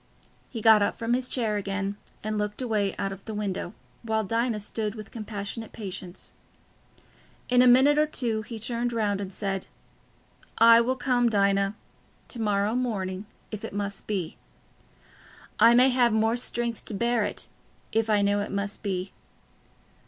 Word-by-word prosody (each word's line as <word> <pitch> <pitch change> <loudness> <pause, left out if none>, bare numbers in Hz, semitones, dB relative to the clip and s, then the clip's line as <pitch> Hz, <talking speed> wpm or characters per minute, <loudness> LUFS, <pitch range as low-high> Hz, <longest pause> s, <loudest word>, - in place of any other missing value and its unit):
He 230 - -6
got 220 -2 +7
up 205 - 0
from 230 +1 -1
his 255 0 0
chair 225 -5 0
again 200 0 -2 0.3
and 215 0 -2
looked 210 0 -3
away 215 -6 0
out 195 -1 -2
of 195 0 -9
the 220 - -5
window, 200 -2 -3 0.3
while 220 -1 0
Dinah 230 +1 0
stood 210 +1 -3
with 215 -1 -9
compassionate 215 0 -6
patience. 190 -4 -8 1.2
In 250 0 +5
a 250 - +6
minute 265 +4 +6
or 305 - +4
two 235 -7 -1
he 230 +1 -7
turned 235 +2 -2
round 205 -3 0
and 195 -1 -5
said, 195 -1 -3 0.9
"I 230 0 +8
will 255 +2 0
come, 245 -2 +2
Dinah... 200 -1 +2 0.5
to 235 - -4
morrow 205 0 +1
morning... 205 -6 -2 0.2
if 215 -2 -6
it - - -6
must 200 -1 -4
be. 185 -6 -3 1.2
I 230 +2 +7
may 255 +2 +6
have 245 -2 +3
more 220 +1 +2
strength 240 -1 -2
to 215 - -4
bear 235 +1 +1
it, 205 - -4 0.4
if 225 0 +1
I 205 -1 +3
know 205 0 +2
it 205 - -3
must 200 +1 -3
be. 190 -2 -3
215 Hz, 165 wpm, -27 LUFS, 200-235 Hz, 1.2 s, I